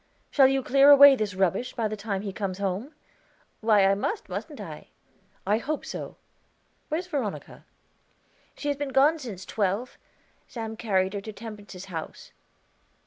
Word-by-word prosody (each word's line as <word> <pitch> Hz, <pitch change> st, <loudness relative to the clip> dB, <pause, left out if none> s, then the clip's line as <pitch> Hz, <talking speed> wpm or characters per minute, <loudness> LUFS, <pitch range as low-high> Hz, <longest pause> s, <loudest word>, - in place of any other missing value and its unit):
"Shall 270 Hz, -3 st, +6 dB
you 270 Hz, 0 st, +1 dB
clear 275 Hz, +3 st, +5 dB
away 285 Hz, -1 st, +10 dB
this 210 Hz, -5 st, -3 dB
rubbish 190 Hz, +6 st, 0 dB
by 230 Hz, -3 st, 0 dB
the 215 Hz, -, -4 dB
time 200 Hz, -1 st, -4 dB
he 200 Hz, -2 st, -5 dB
comes 190 Hz, -2 st, -3 dB
home?" 200 Hz, -, -3 dB, 0.6 s
"Why, 215 Hz, -3 st, +4 dB
I 195 Hz, -, +4 dB
must, 415 Hz, -, -3 dB
mustn't -, -, -6 dB
I?" -, -, -9 dB, 0.6 s
"I 210 Hz, +3 st, +2 dB
hope 300 Hz, +5 st, -3 dB
so. -, -, -7 dB, 0.7 s
Where's 325 Hz, +4 st, -2 dB
Veronica?" 275 Hz, -, -5 dB, 0.9 s
"She 290 Hz, -, -3 dB
has 285 Hz, -, -1 dB
been 285 Hz, -1 st, -3 dB
gone 290 Hz, +5 st, +4 dB
since 210 Hz, -9 st, -7 dB
twelve; 210 Hz, +4 st, -2 dB, 0.5 s
Sam 225 Hz, -2 st, -6 dB
carried 190 Hz, -4 st, 0 dB
her 200 Hz, -, -3 dB
to 215 Hz, -, -7 dB
Temperance's 205 Hz, -3 st, -9 dB
house." 165 Hz, -4 st, -8 dB
220 Hz, 155 wpm, -26 LUFS, 195-270 Hz, 0.9 s, away